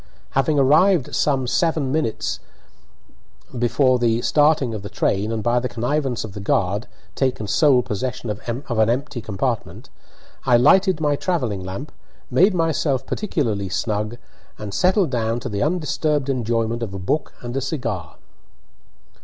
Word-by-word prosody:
Having 135 +3 +1
arrived 150 +4 +4
some 135 -3 +1
seven 155 -1 +1
minutes 145 -7 -1 1.2
before 125 +2 +3
the 115 0 +1
starting 145 -5 +3
of 105 - -5
the 100 - -7
train, 105 +1 0
and, 110 -2 -2
by 120 +1 +2
the 125 +1 -3
connivance 125 +1 -1
of 110 -3 -8
the 100 - -7
guard, 100 +2 0 0.3
taken 130 -5 -1
sole 125 +4 +4
possession 120 +2 -3
of 105 - -6 0.5
empty 135 +1 -2
compartment, 110 +3 -3 0.5
I 125 -2 +5
lighted 190 - +4
my 150 -2 +1
travelling 125 - -1
lamp, 95 +11 -6 0.4
made 190 +2 +4
myself 160 -5 0
particularly 115 - -2
snug, 105 +3 -2 0.4
and 105 -2 -7
settled 185 - +2
down 115 -1 0
to - - -4
the 100 -1 -3
undisturbed 150 -3 0
enjoyment 115 -2 -1
of 100 -4 -4
a - - -3
book 100 +11 -2
and 120 +1 -6
a 135 - 0
cigar. 115 - -4
125 Hz, 145 wpm, -22 LUFS, 110-150 Hz, 1.2 s, I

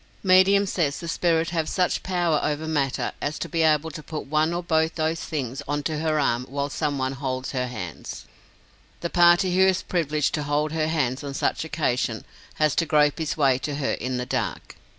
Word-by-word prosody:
Medium 190 +1 +5
says 160 -7 -1
the 170 - -7
spirits 165 0 +1
have 160 -2 -1
such 180 -2 0
power 175 -4 +1
over 150 +1 -2
matter 140 -4 0
as 145 +1 -2
to - - -4
be 165 - -1
able 160 0 +3
to 155 - -7
put 150 +1 -6
one 155 +3 +1
or 175 +1 -2
both 160 -1 +1
those 160 0 0
things 135 -4 -4
on 145 +1 -1
to 155 0 -2
her 155 -1 +1
arm 120 -3 +1
while 140 +1 -2
some 145 -2 -1
one 130 0 -1
holds 130 -1 -3
her 125 -2 -1
hands. 105 -9 -7 0.8
The 170 - -3
party 175 +1 +5
who 190 - +4
is 190 -1 +1
privileged 155 -4 0
to 150 - -1
hold 145 +1 0
her 155 -1 0
hands 145 -4 -1
on 140 -1 -5
such - - 0
occasion, 150 -6 -1 0.3
has 155 -2 +2
to 165 - +2
grope 150 -1 +3
his 160 -1 -2
way 135 -4 +3
to 140 +3 -3
her 140 -2 -1
in 130 0 -2
the 125 - -2
dark. - - -3
155 Hz, 210 wpm, -24 LUFS, 140-165 Hz, 0.8 s, Medium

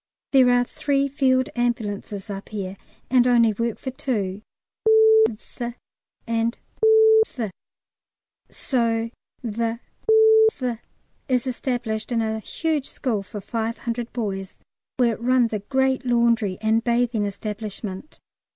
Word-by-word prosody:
There 260 -2 +6
are 245 0 +4
three 280 +2 0
field 260 -2 +1
ambulances 210 -4 -2
up 195 0 -7
here, 195 -3 -5 0.4
and 250 -1 +5
only 235 -3 +4
work 230 +2 -2
for 260 - -5
two 210 -8 -3 0.5
( 440 0 +6
th 235 +2 -7 0.5
and 230 0 -1 0.7
th), 225 -6 -5 1.0
so 230 -3 -1 0.3
the 230 0 -2 0.8
th 245 -4 -3 0.5
is 250 -1 +1
established 245 -3 -3
in 235 - +1
a 220 0 -2
huge 305 +4 -2
school 230 -7 -2
for 195 +2 -8
500 230 +2 -3
boys, 195 -5 -4 0.4
where 240 -3 +3
it 225 - -9
runs 245 -1 +2
a 215 - -1
great 265 +4 0
laundry 235 -5 +2
and 220 +1 +2
bathing 235 -3 +1
establishment. 205 +2 -6
235 Hz, 120 wpm, -23 LUFS, 215-255 Hz, 1.0 s, There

